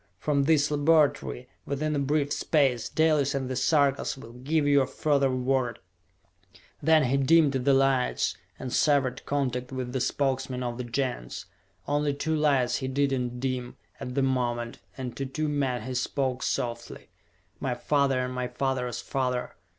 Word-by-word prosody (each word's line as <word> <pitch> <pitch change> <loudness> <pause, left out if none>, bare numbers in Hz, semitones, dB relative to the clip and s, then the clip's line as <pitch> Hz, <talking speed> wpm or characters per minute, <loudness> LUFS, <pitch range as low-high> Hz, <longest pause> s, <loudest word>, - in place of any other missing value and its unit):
From 140 +4 +1
this 150 -1 +3
laboratory, 150 - +2 0.2
within 150 +2 -2
a - - 0
brief 145 +1 0
space, 135 -7 +1
Dalis 150 -3 +2
and 135 -1 -2
the 130 - -3
Sarkas 140 +1 +2
will 115 -3 -11
give 145 +5 0
you 140 -1 +4
further 140 -3 +1
word!" 130 -1 0 1.0
Then 155 +1 +5
he 130 +2 +1
dimmed 150 +2 +4
the 135 +1 +2
lights, 135 -2 +2 0.2
and 125 - -6
severed 140 -4 +2
contact 125 -3 -1
with 130 -1 -4
the 130 - -1
Spokesmen 130 -2 -1
of 120 0 -4
the - - -2
Gens. 120 - -3 0.4
Only 145 0 +1
two 160 +2 -1
lights 140 -5 +2
he 130 - -3
did 140 +1 +1
not 125 -2 -2
dim, 125 -1 -3 0.2
at 125 - -6
the 140 - +2
moment, 120 -3 -1 0.2
and 125 -2 -5
to 135 - -2
two 155 +4 -2
men 135 -5 -1
he 130 - -5
spoke 130 0 -1
softly. 120 -1 -3 0.5
"My 125 -2 -1
father 140 0 +1
and 125 - -5
my 125 0 -2
father's 130 -2 -2
father! 125 -2 -2
135 Hz, 160 wpm, -27 LUFS, 125-145 Hz, 1.0 s, Then